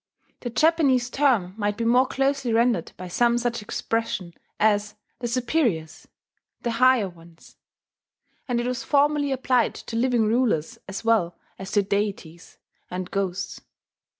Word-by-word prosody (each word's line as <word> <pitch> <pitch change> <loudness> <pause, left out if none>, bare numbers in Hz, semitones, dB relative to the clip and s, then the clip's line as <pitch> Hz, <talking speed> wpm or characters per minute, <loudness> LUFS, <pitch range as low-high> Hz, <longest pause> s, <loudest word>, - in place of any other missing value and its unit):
The 245 - -5
Japanese 260 -2 +2
term 245 -11 +2
might 205 0 -1
be 230 - -2
more 250 +3 +4
closely 270 -2 0
rendered 230 -6 +2
by 185 - -7
some 235 +6 +2
such 240 -1 -1
expression 210 -4 -3 0.3
as 210 -1 +2 0.2
"the 245 - -3
Superiors," 235 - -1 0.6
"the 235 - 0
Higher 250 -2 +4
Ones"; 170 -1 -16 0.9
and 245 -2 0
it 240 - -2
was 250 -1 -2
formerly 290 0 +2
applied 255 -3 +1
to 230 - -8
living 240 -1 +2
rulers 230 -3 0
as 190 +3 -6
well 195 -7 +2 0.2
as 190 0 -7
to 205 - +3
deities 195 -4 -3 0.3
and 180 0 -5
ghosts. 195 -2 -3
230 Hz, 140 wpm, -24 LUFS, 195-255 Hz, 0.9 s, more